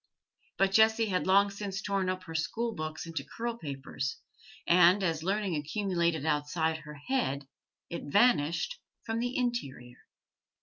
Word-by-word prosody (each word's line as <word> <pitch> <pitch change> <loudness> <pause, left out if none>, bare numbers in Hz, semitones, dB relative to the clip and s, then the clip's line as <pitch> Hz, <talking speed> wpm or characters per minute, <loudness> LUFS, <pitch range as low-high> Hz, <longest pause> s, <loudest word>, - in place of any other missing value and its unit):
But 195 0 +3
Jessie 220 +1 +4
had 185 -1 0
long 200 +1 +5
since 195 -1 -4
torn 195 -2 -1
up 185 0 -3
her 165 -3 -9
school 225 +9 -1
books 155 -2 -5
into 165 -4 -4
curl 230 - -4
papers, 140 - -4 0.5
and, 180 +3 +6
as 165 -3 0
learning 195 0 0
accumulated 170 -1 0
outside 160 +2 0
her 150 -1 -10
head, 145 - -2 0.4
it 170 - -6
vanished 205 - +3 0.2
from 225 0 -2
the 245 +1 -2
interior. 140 - -3
180 Hz, 140 wpm, -30 LUFS, 155-210 Hz, 0.5 s, and